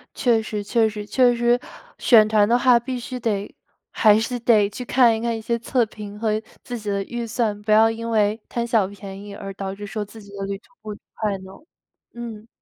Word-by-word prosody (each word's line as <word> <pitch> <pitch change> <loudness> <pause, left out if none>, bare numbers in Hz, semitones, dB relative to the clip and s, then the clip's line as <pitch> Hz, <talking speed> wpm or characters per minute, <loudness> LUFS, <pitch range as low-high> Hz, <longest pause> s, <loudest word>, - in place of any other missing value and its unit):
确 235 -3 +2
实， 210 -1 -4
确 225 +2 +2
实， 210 -1 -6
确 245 +3 +3
实 240 +1 +2 0.4
选 220 -4 +6
团 215 -1 +3
的 235 +2 +4
话 250 -1 +5
必 250 +1 -4
须 250 +1 -6
得 210 -4 -2 0.4
还 215 -1 +5
是 245 +2 -2
得 220 -4 +4
去 210 +5 -7
看 240 -2 +4
一 220 - -4
看 235 -1 -1
一 - - -7
些 235 +2 -1
测 240 +1 +1
评 210 -1 -9
和 215 -1 0 0.2
自 245 - -5
己 210 -1 -5
的 200 0 -1
预 240 +3 -5
算， 220 -2 -1
不 210 +1 -2
要 220 +1 +6
因 230 +1 -4
为 215 0 +2
贪 235 -1 -2
小 225 -5 +2
便 195 0 -9
宜 205 -1 -9
而 195 -1 -7
导 195 0 -5
致 205 +1 -8
说 210 +1 -4
自 215 +2 -12
己 200 - -15
的 195 - -3
旅 195 0 -3
途 210 - -27
不 215 - -7 0.2
快 210 -3 -1
呢。 190 0 -12 0.6
嗯。 230 -2 -8
220 Hz, 245 characters per minute, -22 LUFS, 205-235 Hz, 0.6 s, 选